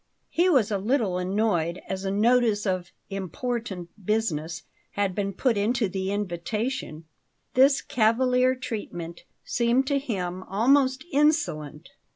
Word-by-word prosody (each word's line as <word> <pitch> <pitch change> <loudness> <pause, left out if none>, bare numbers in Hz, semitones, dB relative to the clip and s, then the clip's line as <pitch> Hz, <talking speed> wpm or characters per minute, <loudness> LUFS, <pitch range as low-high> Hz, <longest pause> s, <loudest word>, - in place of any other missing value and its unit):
He 355 +2 +3
was 255 - +3
a 200 - 0
little 210 -4 0
annoyed, 180 -3 0
as 190 0 -4
a - - 0
notice 220 +1 +3
of 185 -2 -2 0.2
"important 195 -1 -4
business" 180 -5 -1 0.3
had 200 -2 0
been 200 0 -1
put 230 +3 +1
into 220 +2 +1
the 190 +1 -3
invitation; 205 - -3 0.5
this 270 +2 +5
cavalier 250 +3 +2
treatment 175 -9 -6 0.2
seemed 240 +3 +2
to 280 +1 +1
him 185 -9 -3
almost 260 +7 +2
insolent. 275 - +1
210 Hz, 125 wpm, -26 LUFS, 185-250 Hz, 0.5 s, this